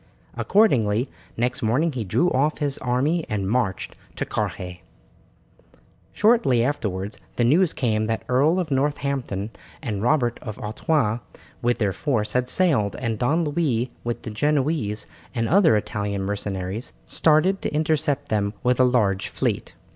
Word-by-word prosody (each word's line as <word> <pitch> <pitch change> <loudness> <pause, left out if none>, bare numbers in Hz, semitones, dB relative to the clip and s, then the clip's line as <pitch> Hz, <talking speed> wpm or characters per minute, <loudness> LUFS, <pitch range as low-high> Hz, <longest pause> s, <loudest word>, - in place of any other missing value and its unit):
Accordingly, 125 - +2 0.3
next 125 +2 -1
morning 130 +10 +2
he 125 -5 -3
drew 170 - +1
off 145 +4 +1
his 145 -3 -1
army 135 +7 +1
and 100 -3 -1
marched 105 -4 -1 0.2
to - - -2
Carhaix. 90 -2 -4 1.3
Shortly 210 - +3
afterwards 105 -7 -2 0.2
the 120 - +1
news 155 +8 +4
came 110 -3 0
that 115 0 -1
the 125 - -3
Earl 150 +8 +4
of 170 -5 -3
Northampton 135 -7 -1 0.3
and 110 -9 -3
Robert 120 -1 +1
of 110 -3 -6
Artois, 115 +1 0 0.4
with 120 0 +1
their 100 -4 0
force, 110 -6 -1
had 125 0 0
sailed, 140 - +2
and 115 -4 -3
Don 160 +8 +2
Louis, 145 -6 0
with 120 0 -3
the 110 - -5
Genoese 140 -3 0 0.3
and 115 -1 0
other 170 - +5
Italian 100 -2 -2
mercenaries, 100 +1 -4
started 160 - +3
to - - -2
intercept 150 -2 0
them 105 -1 0
with 125 0 +2
a - - +7
large 105 -6 +2
fleet. - - -2
125 Hz, 145 wpm, -24 LUFS, 105-150 Hz, 1.3 s, a